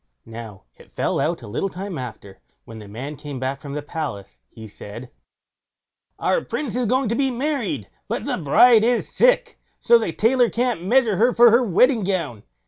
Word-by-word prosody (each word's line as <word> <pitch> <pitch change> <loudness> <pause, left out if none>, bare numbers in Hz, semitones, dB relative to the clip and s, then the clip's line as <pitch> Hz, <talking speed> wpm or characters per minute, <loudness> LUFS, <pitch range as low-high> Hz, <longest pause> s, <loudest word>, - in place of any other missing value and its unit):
Now, 115 -3 -10
it - - -18
fell - - -1
out 165 -4 -1
a - - -9
little 125 - -2
time 190 0 -6
after, 110 -6 -9 0.3
when 115 -1 -10
the 105 - -11
man 130 +9 -7
came 140 -1 -8
back 135 +1 -3
from 140 -1 -8
the 145 0 -4
palace, 145 -11 -6
he 110 -1 -11
said: 110 +4 -10 1.1
"Our - - 0
Prince 265 -7 -4
is 250 -2 0
going 260 +2 +1
to 230 - 0
be 270 +1 +1
married, 245 - -2 0.2
but - - -3
the - - -2
bride 220 - +5
is 240 +1 +1
sick, - - +2 0.2
so 235 -1 +5
the 220 - -2
tailor 240 +6 +2
can't 240 -7 -1
measure 225 0 +2
her 240 +4 +3
for 240 -1 +6
her 235 +3 +5
wedding 235 +2 +3
gown. 170 - -2
185 Hz, 190 wpm, -22 LUFS, -, 1.1 s, for